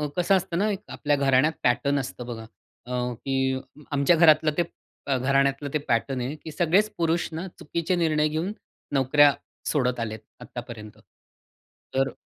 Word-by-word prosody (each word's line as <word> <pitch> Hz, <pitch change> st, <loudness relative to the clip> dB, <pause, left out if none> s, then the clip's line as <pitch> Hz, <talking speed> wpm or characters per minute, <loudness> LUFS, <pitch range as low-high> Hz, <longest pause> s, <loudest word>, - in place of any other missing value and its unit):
कसं 180 Hz, +2 st, +3 dB
असतं 185 Hz, -2 st, -1 dB
ना, 205 Hz, +4 st, +2 dB, 0.2 s
आपल्या 145 Hz, -1 st, +1 dB
घराण्यात 140 Hz, +2 st, +3 dB
पॅटर्न 140 Hz, +3 st, +2 dB
असतं 125 Hz, -2 st, -6 dB
बघा, 115 Hz, -2 st, -7 dB, 0.4 s
अ, 125 Hz, 0 st, -2 dB
की 130 Hz, +2 st, -1 dB, 0.3 s
आमच्या 145 Hz, +4 st, +4 dB
घरातलं 155 Hz, -2 st, +5 dB
ते 175 Hz, -, +3 dB, 0.5 s
घराण्यातलं 140 Hz, +2 st, +1 dB
ते -, -, +3 dB
पॅटर्न 125 Hz, +3 st, 0 dB
आहे 130 Hz, +5 st, -3 dB
की 160 Hz, -, -7 dB
सगळेच 175 Hz, +7 st, +2 dB
पुरुष 170 Hz, 0 st, +1 dB
ना, 170 Hz, +4 st, -4 dB
चुकीचे 170 Hz, +4 st, -1 dB
निर्णय 155 Hz, -3 st, +2 dB
घेऊन 160 Hz, +5 st, -2 dB, 0.4 s
नोकऱ्या 140 Hz, +2 st, +5 dB, 0.4 s
सोडत 125 Hz, -4 st, +1 dB
आलेत 110 Hz, -1 st, -3 dB, 0.2 s
आत्तापर्यंत. 115 Hz, -3 st, -9 dB, 1.0 s
तर 135 Hz, 0 st, +2 dB
140 Hz, 140 wpm, -25 LUFS, 125-160 Hz, 1.0 s, घरातलं